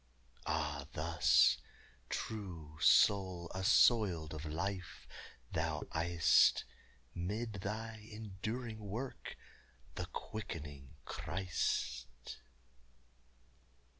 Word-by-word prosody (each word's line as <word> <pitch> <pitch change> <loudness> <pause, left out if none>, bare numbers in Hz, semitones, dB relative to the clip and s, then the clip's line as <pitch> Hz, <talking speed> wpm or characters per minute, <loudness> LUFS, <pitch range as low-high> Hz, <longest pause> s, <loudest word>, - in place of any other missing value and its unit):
_Ah 70 -1 -1
thus, 75 -6 +4 0.5
true 85 -8 -5
soul 95 -4 +4
assoiled 95 -4 +4
of 75 0 -6
life, 90 +4 -4 0.4
thou - - -1
ey'st, 85 0 +4 0.5
Mid 105 +6 -3
thy 110 +2 -5
enduring 110 +2 -5
work, 110 +6 -6 0.6
the - - -4
quickening 75 -10 -7
Christ! 65 -9 -3
90 Hz, 70 wpm, -36 LUFS, 80-105 Hz, 0.6 s, thus